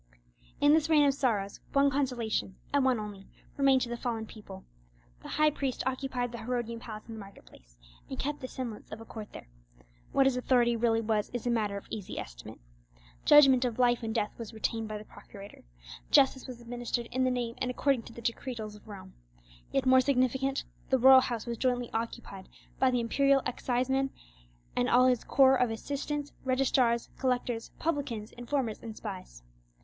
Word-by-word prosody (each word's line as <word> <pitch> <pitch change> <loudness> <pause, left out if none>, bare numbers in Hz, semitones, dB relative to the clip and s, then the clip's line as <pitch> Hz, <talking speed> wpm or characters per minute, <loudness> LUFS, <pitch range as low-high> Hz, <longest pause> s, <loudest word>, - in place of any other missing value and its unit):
In 290 +1 +5
this 315 0 +3
rain 300 -2 +5
of 275 - +3
sorrows, 215 -8 -1
one 280 0 +4
consolation, 245 -8 -1 0.2
and 285 -1 +3
one 260 -3 +2
only, 205 -2 -8 0.3
remained 270 -2 +4
to 240 - -4
the 240 - -2
fallen 230 -3 -3
people: 200 -3 -11 0.6
the - - -10
high 305 0 +3
priest 275 -3 -3
occupied 260 -2 -2
the 235 - -7
Herodian 235 0 -3
palace 215 -3 -8
in 230 - -8
the 220 - -8
market 200 -1 -12
place, - - -20 0.3
and 265 - -5
kept 295 +2 -3
the 255 - -4
semblance 240 -5 -7
of 215 - -6
a 225 - -10
court 215 -1 -9
there. - - -11 0.6
What 270 - +4
his 270 -2 +3
authority 245 -2 +3
really 225 -1 +2
was 215 -2 0
is 245 - -4
a 245 - +1
matter 210 -3 0
of 200 - -9
easy 205 -4 -6
estimate. - - -8 0.7
Judgment 270 -4 +7
of 240 -3 -1
life 245 -1 +3
and 225 -1 -3
death 210 -2 0
was 225 -1 -7
retained 225 0 -2
by 215 0 -4
the 210 - -10
procurator. 200 - -13 0.4
Justice 265 -2 +4
was 250 -2 -8
administered 240 0 -3
in 255 +1 0
the 255 - +3
name 245 -2 -2
and 255 - -1
according 265 0 +1
to - - -12
the 235 - -10
decretals 230 -2 -3
of 210 +1 -16
Rome. 190 -3 -10 0.6
Yet 270 - 0
more 260 0 +6
significant, 265 +1 +1 0.3
the 265 - +4
royal 260 +1 +8
house 235 -3 -3
was 235 -2 -4
jointly 245 -2 0
occupied 225 -4 -5 0.3
by 260 - +4
the 250 -1 +1
imperial 275 +3 +3
exciseman, 260 +2 0 0.7
and 245 0 +1
all 250 +1 +5
his 250 -3 +2
corps 265 -1 +5
of 250 - +3
assistants, 285 +5 -4
registrars, 255 -2 +2
collectors, 245 -3 -1
publicans, 275 -9 -2
informers, 245 -2 -3
and 225 -2 -8
spies. 185 - -8
245 Hz, 185 wpm, -30 LUFS, 225-265 Hz, 0.7 s, royal